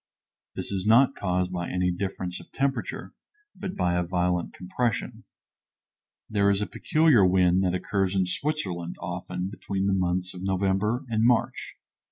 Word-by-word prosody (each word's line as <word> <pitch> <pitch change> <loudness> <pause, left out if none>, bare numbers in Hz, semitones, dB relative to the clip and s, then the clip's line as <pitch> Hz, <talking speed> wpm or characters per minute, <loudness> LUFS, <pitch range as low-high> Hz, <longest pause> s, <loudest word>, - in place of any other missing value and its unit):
This - - -3
is 95 0 -2
not 125 +5 +6
caused 90 -3 -1
by 85 -1 -3
any 90 0 +1
difference 90 -1 -4
of - - -15
temperature, 135 0 -2 0.4
but 190 - -5
by 90 -1 +1
a 90 - +1
violent 90 0 0
compression. 105 +5 -3 1.0
There 100 -2 +2
is 100 -1 +2
a 105 - 0
peculiar 155 - +3
wind 90 0 +4
that 90 -1 +1
occurs 95 +1 -1
in 95 -1 +2
Switzerland, 90 - -3
often, 90 +1 -4
between 100 -1 -3
the 100 - +2
months 90 0 0
of 90 - -9
November 95 +6 0
and 110 -2 0
March. 120 -1 +1
95 Hz, 155 wpm, -26 LUFS, 90-105 Hz, 1.0 s, not